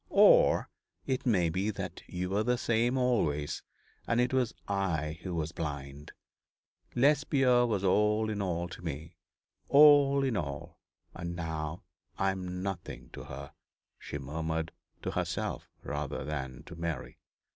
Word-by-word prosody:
Or -, -, +6 dB, 0.4 s
it 130 Hz, -1 st, -1 dB
may 90 Hz, -8 st, +3 dB
be 95 Hz, +5 st, 0 dB
that 105 Hz, -, -5 dB
you 90 Hz, +1 st, -3 dB
were 100 Hz, +2 st, +2 dB
the 125 Hz, +2 st, +1 dB
same 120 Hz, +2 st, +1 dB
always, 80 Hz, -, +1 dB, 0.5 s
and 115 Hz, -, +2 dB
it 125 Hz, +1 st, +2 dB
was 125 Hz, -3 st, +2 dB, 0.2 s
I 85 Hz, -6 st, -1 dB
who 90 Hz, -1 st, -4 dB
was 80 Hz, -1 st, -2 dB
blind. 75 Hz, -3 st, -5 dB, 0.8 s
Lesbia 135 Hz, -2 st, +4 dB
was 105 Hz, -4 st, 0 dB
all 105 Hz, +3 st, +3 dB
in 105 Hz, -1 st, -2 dB
all 85 Hz, -2 st, -1 dB
to -, -, -9 dB
me. 80 Hz, 0 st, -5 dB, 0.6 s
All 140 Hz, -1 st, +7 dB
in 130 Hz, -4 st, +1 dB
all 70 Hz, -6 st, -4 dB, 0.3 s
and 85 Hz, -1 st, -5 dB
now 80 Hz, -1 st, -4 dB, 0.3 s
I 95 Hz, 0 st, +2 dB
am 90 Hz, -1 st, -5 dB
nothing 95 Hz, -3 st, -5 dB
to -, -, -8 dB
her,' -, -, -8 dB, 0.5 s
she -, -, -5 dB
murmured, 80 Hz, +3 st, -3 dB, 0.3 s
to -, -, -1 dB
herself -, -, -2 dB
rather 75 Hz, -2 st, -3 dB
than 70 Hz, -2 st, -4 dB
to 90 Hz, -, -10 dB
Mary. 85 Hz, -4 st, -4 dB
90 Hz, 145 wpm, -31 LUFS, 80-120 Hz, 0.8 s, All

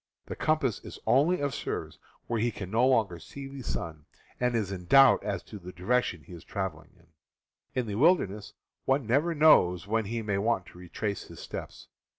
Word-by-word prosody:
The -, -, -6 dB
com 155 Hz, 0 st, +2 dB
pass 130 Hz, -7 st, -1 dB
is -, -, -9 dB
only 150 Hz, +7 st, +3 dB
of 140 Hz, -2 st, -1 dB
service -, -, -5 dB, 0.3 s
when 115 Hz, -2 st, -1 dB
he 120 Hz, -, +2 dB
can 100 Hz, -4 st, -7 dB
no 120 Hz, +4 st, +3 dB
longer 110 Hz, -9 st, +2 dB
see 140 Hz, +10 st, -9 dB
the 135 Hz, 0 st, -8 dB
sun, 80 Hz, -9 st, -5 dB, 0.3 s
and 125 Hz, -1 st, +1 dB
is 105 Hz, -4 st, -1 dB
in 90 Hz, -2 st, -6 dB
doubt 135 Hz, +6 st, +6 dB
as 100 Hz, -3 st, -3 dB
to 105 Hz, -, -10 dB
the 90 Hz, 0 st, -9 dB
direction 90 Hz, -, 0 dB
he 90 Hz, -, -13 dB
is 85 Hz, -, -10 dB
traveling 95 Hz, -6 st, -5 dB
in. 85 Hz, -, -24 dB, 0.7 s
In 125 Hz, -, -1 dB
the 105 Hz, -, -4 dB
wilderness 105 Hz, -, +2 dB, 0.3 s
one 135 Hz, -1 st, +2 dB
never 145 Hz, +9 st, +1 dB
knows 100 Hz, -, +5 dB
when 110 Hz, +1 st, 0 dB
he 115 Hz, +2 st, -3 dB
may 100 Hz, -2 st, -1 dB
want 110 Hz, -3 st, 0 dB
to 90 Hz, -, -14 dB
retrace 100 Hz, +3 st, -4 dB
his -, -, -12 dB
steps. -, -, -8 dB
110 Hz, 200 wpm, -29 LUFS, 95-130 Hz, 0.7 s, doubt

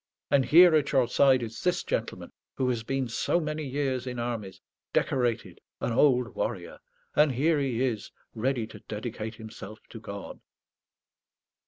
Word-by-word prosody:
And 135 Hz, -2 st, +4 dB
here, 170 Hz, +6 st, +8 dB
at 150 Hz, -3 st, +2 dB
your 130 Hz, -3 st, +4 dB
side, 130 Hz, 0 st, +4 dB
is 115 Hz, 0 st, -6 dB
this 180 Hz, 0 st, +1 dB
gentleman, -, -, -3 dB, 0.2 s
who 130 Hz, -, 0 dB
has 120 Hz, -3 st, -1 dB
been 135 Hz, +2 st, -2 dB
so 120 Hz, +8 st, 0 dB
many 155 Hz, -1 st, -3 dB
years 130 Hz, -2 st, -2 dB
in 125 Hz, -1 st, -4 dB
armies 115 Hz, -5 st, -4 dB, 0.3 s
decorated, 115 Hz, -7 st, 0 dB, 0.2 s
an -, -, -2 dB
old 125 Hz, -1 st, +3 dB
warrior. -, -, -4 dB, 0.4 s
And 150 Hz, -2 st, +4 dB
here 150 Hz, +5 st, +2 dB
he 130 Hz, -3 st, 0 dB
is, 115 Hz, -5 st, -3 dB, 0.2 s
ready 120 Hz, 0 st, -1 dB
to 110 Hz, -1 st, -12 dB
dedicate 110 Hz, +1 st, -6 dB
himself 110 Hz, -1 st, -9 dB
to 115 Hz, -, -9 dB
God." 100 Hz, -2 st, -8 dB
125 Hz, 155 wpm, -28 LUFS, 115-140 Hz, 0.4 s, here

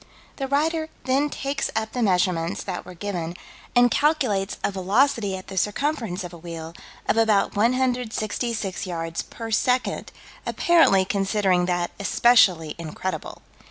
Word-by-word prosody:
The 270 Hz, -, -2 dB
writer 315 Hz, +3 st, 0 dB
then 275 Hz, +3 st, +1 dB
takes 275 Hz, 0 st, -2 dB
up 220 Hz, 0 st, -1 dB
the 250 Hz, -, -3 dB
measurements 180 Hz, -4 st, +1 dB
that 185 Hz, -3 st, -5 dB
were 180 Hz, -, -9 dB
given, 175 Hz, -3 st, -4 dB, 0.4 s
and 245 Hz, 0 st, +5 dB
calculates 255 Hz, -11 st, +1 dB
a -, -, +1 dB
velocity 200 Hz, +1 st, +1 dB
at 185 Hz, -, -10 dB
the 190 Hz, -, -8 dB
circumference 215 Hz, -, -1 dB
of 175 Hz, 0 st, -8 dB
a 170 Hz, -, -10 dB
wheel, 165 Hz, -1 st, -7 dB, 0.3 s
of -, -, +2 dB
about 220 Hz, -3 st, +3 dB
166 230 Hz, -3 st, -1 dB
yards 165 Hz, -1 st, -3 dB
per 225 Hz, -1 st, -8 dB
second, 250 Hz, +3 st, 0 dB, 0.3 s
apparently 325 Hz, -, +4 dB
considering 195 Hz, -2 st, +1 dB
that 175 Hz, -1 st, 0 dB
especially 190 Hz, -7 st, +4 dB
incredible. 170 Hz, +3 st, -5 dB
205 Hz, 135 wpm, -24 LUFS, 180-250 Hz, 0.4 s, and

